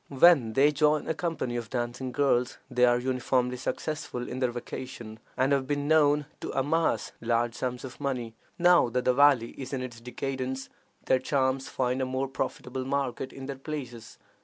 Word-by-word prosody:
When 135 -5 +5
they 140 +4 +5
join 150 0 +2
a - - +1
company 160 -7 -2
of 115 -2 -5
dancing 120 +1 -3
girls, 125 -2 +1
they 125 0 +4
are 120 0 +4
uniformly 125 0 0
successful 145 -2 -4
in 125 - -5
their 130 -1 +2
vocation, 120 -2 -7 0.2
and 130 +2 +2
have 135 -2 +2
been 145 0 -1
known 150 -1 +4
to - - -5
amass 160 +5 +1
large 115 0 +1
sums 125 0 -3
of 130 - -10
money. 125 -5 -2 0.2
Now 175 -6 +5
that 125 +1 -1
the 125 - +4
valley 135 -3 +5
is 135 +1 -6
in 130 -1 -2
its 120 -2 -8
decadence, 130 +1 -4 0.4
their 130 - +3
charms 130 0 0
find 125 0 0
a - - +1
more 130 +1 -1
profitable 130 0 -4
market 135 -1 -2
in 135 - -9
other 135 0 -6
places. 125 -6 -7
130 Hz, 180 wpm, -28 LUFS, 125-140 Hz, 0.4 s, When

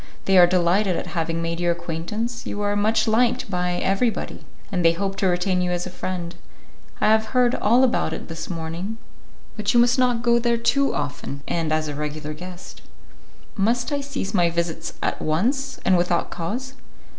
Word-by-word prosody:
They 195 - +3
are 175 - +8
delighted 180 +2 +2
at - - -3
having 165 0 -1
made 165 0 -2
your 175 0 +2
acquaintance; 175 +8 -4
you 205 - -4
are 205 0 +1
much 220 +2 +2
liked 235 0 +2
by 180 -1 0
everybody, 195 +6 0 0.3
and 180 -3 0
they 165 0 +5
hope 195 +3 -2
to 195 - +1
retain 180 +1 +1
you 180 - 0
as 175 0 -1
a 185 - -6
friend; 180 -2 -4 0.7
I 215 - +3
have 220 0 +4
heard 245 -1 +4
all 240 +3 +3
about 245 -10 +1
it 160 - -6
this 165 -1 -6
morning; 170 +5 -4 0.6
but 210 0 -1
you - - +7
must 245 +2 +4
not 245 -2 +2
go 235 -1 +4
there 235 0 +1
too 275 +4 +2
often 140 +1 -4
and 165 -2 -1
as 155 0 +1
a 150 - -3
regular 150 +1 -4
guest." 180 +3 -10 0.7
"Must 235 +6 +1
I 285 -1 0
cease 275 -8 -4
my 175 -4 +3
visits 170 -1 -2
at - - -1
once, 255 - 0
and 190 - +5
without 175 -1 +1
cause?" 245 +11 -4
190 Hz, 190 wpm, -23 LUFS, 170-235 Hz, 0.7 s, are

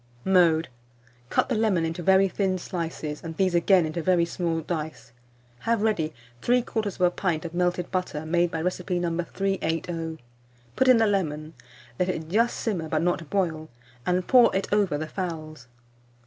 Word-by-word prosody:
380. 190 - 0 0.2
Mode. 160 - -3 0.6
Cut - - +2
the 260 - -1
lemon 215 -7 +2
into 165 +2 -3
very 190 +2 +5
thin 190 0 0
slices, 165 -4 -5
and 160 -1 -7
these 190 -2 +2
again 175 +1 +4
into 155 +2 -3
very 175 0 +3
small 170 -1 -2
dice. 150 -8 -5 0.5
Have 230 - 0
ready 175 -8 +1 0.3
3/4 215 -7 +1
pint 170 -4 -1
of 165 - -6
melted 180 0 0
butter, 180 -5 -2
made 175 +2 +2
by 160 -1 -3
recipe 180 0 -1
No. 175 -1 -1
380; 165 -3 -2 0.6
put 260 - +2
in 255 -2 +7
the 225 - +4
lemon; 155 -6 -1 0.5
let 180 0 +1
it 160 -3 -3
just 230 +6 +2
simmer, 175 -8 -2
but 155 0 0
not 170 -3 -1
boil, 160 -5 -1 0.3
and 180 +3 0
pour 245 -2 +6
it 195 - 0
over 200 -8 +2
the 155 - -3
fowls. 155 -6 -6
175 Hz, 165 wpm, -26 LUFS, 160-195 Hz, 0.6 s, in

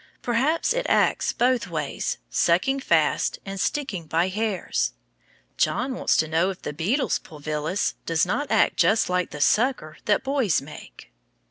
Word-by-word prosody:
Perhaps 275 - +1
it - - -2
acts - - +2
both 250 -3 +1
ways, 155 -5 -3
sucking 185 +11 +2
fast 165 - +1
and 195 0 -6
sticking 195 - -2
by 165 +4 +1
hairs. 210 -1 -1 0.6
John 255 +5 0
wants - - +1
to 160 - +2
know 165 +4 +1
if 190 - -7
the 150 - -4
beetle's 205 - 0
pulvillus 155 +3 -3
does 165 +1 +2
not 250 +11 -2
act - - +3
just 220 -4 +3
like 180 0 0
the 150 - -8
"sucker" 210 - +1
that 210 - +2
boys 265 - +1
make. 145 +3 -12
190 Hz, 150 wpm, -24 LUFS, 160-255 Hz, 0.6 s, act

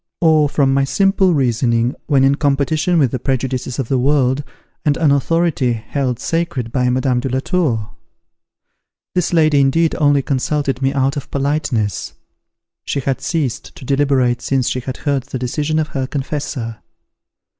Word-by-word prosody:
or 155 -3 +4
from 135 -2 +2
my 135 0 +3
simple 190 +3 +2
reasoning, 120 -2 +1
when 140 -3 +3
in 135 +1 +4
competition 150 +4 +1
with 135 -7 +3
the 130 - -2
prejudices 130 -1 -2
of 135 -4 -2
the 130 0 +1
world, 135 0 +2 0.4
and 150 -4 +2
an 155 -3 +3
authority 140 -2 +1
held 125 +2 -2
sacred 145 -6 -2
by 125 0 +1
Madame 130 0 +1
de 130 - -3
la 130 +1 0
Tour? 130 - -1 1.2
This 180 -2 0
lady 155 -4 +4
indeed 155 +4 +2
only 145 -2 +3
consulted 135 0 -1
me 135 0 +2
out 135 +1 0
of 140 - -6
politeness; 140 -7 -1 0.7
she 140 - -2
had 135 0 -2
ceased 150 -9 -3
to 130 - -11
deliberate 135 -3 +1
since 135 -2 0
she 130 - -1
had 130 +1 -6
heard 140 -3 -1
the - - -5
decision 145 +5 -1
of 155 -1 0
her 130 -2 -3
confessor. 135 -5 -4
135 Hz, 160 wpm, -18 LUFS, 130-150 Hz, 1.2 s, or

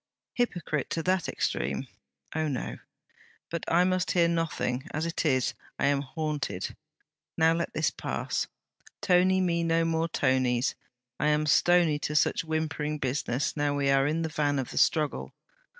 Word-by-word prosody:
Hypocrite 175 - -1
to 165 - -2
that 185 0 +1
extreme? - - -1 0.5
Oh, 155 0 0
no! 135 -4 -4 0.7
But 170 - -3
I 175 +2 +5
must 185 0 +1
hear 170 -2 +4
nothing. 165 -5 -1
As 155 +2 -2
it 170 -1 -1
is, 130 -3 +2 0.2
I - - +1
am 140 0 +2
haunted. 145 - -3 0.6
Now 160 0 +5
let 170 +1 -2
this - - +1
pass. - - -3 0.5
Tony 185 0 +4
me 170 -2 +1
no 165 0 +2 0.2
Tonies; 130 -5 +1 0.5
I 145 - +1
am 150 0 +2
stony 160 +1 +4
to 150 - -3
such - - +3
whimpering 155 -1 -2
business 135 -1 -1
now 145 -1 0
we 140 -1 +2
are 135 0 +4
in 160 +2 0
the 160 - -2
van 145 -2 0
of 130 -3 -3
the - - -1
struggle. 155 -3 +1
155 Hz, 155 wpm, -28 LUFS, 145-170 Hz, 0.7 s, I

